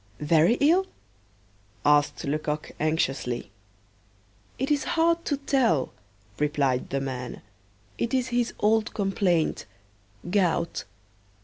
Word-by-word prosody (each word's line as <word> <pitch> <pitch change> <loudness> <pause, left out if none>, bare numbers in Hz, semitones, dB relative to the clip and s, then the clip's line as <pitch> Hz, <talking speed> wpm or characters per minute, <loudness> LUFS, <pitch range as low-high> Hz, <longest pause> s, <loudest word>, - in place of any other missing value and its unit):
"Very 160 +8 +4
ill?" 350 +6 +4 1.0
asked 145 0 +3
Lecoq 150 +1 -2
anxiously. 135 -8 -1 1.1
"It 265 +3 -1
is 290 -2 +2
hard 335 +1 +2
to 285 - 0
tell," 260 - +1 0.5
replied 145 -4 0
the 135 - -1
man: 130 -2 -5 0.6
"it 235 - -1
is 255 -1 0
his 240 -1 0
old 220 +1 +2
complaint 195 -5 0 0.6
gout." 175 -3 0
175 Hz, 100 wpm, -26 LUFS, -, 1.1 s, Very